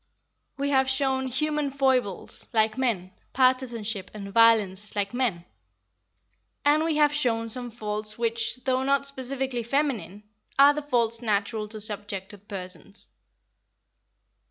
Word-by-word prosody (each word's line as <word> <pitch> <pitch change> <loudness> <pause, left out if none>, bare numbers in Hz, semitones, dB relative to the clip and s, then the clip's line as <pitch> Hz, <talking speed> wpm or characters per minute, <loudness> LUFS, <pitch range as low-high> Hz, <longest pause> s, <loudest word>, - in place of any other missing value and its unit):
We 280 +1 -1
have 265 -1 +3
shown 265 -1 +1
human 300 +3 -1
foibles, 260 -8 0
like 220 -1 +2
men, 225 -8 -1 0.2
partisanship 235 -6 +1
and 200 -1 -8
violence, 215 -3 +4
like 200 0 -1
men, 230 -9 -1 1.2
and 300 +2 +4
we 325 -1 0
have 295 -1 +4
shown 230 -6 +1
some 245 +1 -1
faults 215 -1 -3
which, 230 0 0
though 260 -1 +1
not 275 +1 +1
specifically 265 -2 -2
feminine, 230 - -2 0.3
are 280 +1 +7
the 300 - -3
faults 235 -5 +1
natural 215 -1 -1
to 215 +1 -5
subjected 205 -1 -4
persons. 190 +1 -1
235 Hz, 125 wpm, -26 LUFS, 210-265 Hz, 1.2 s, are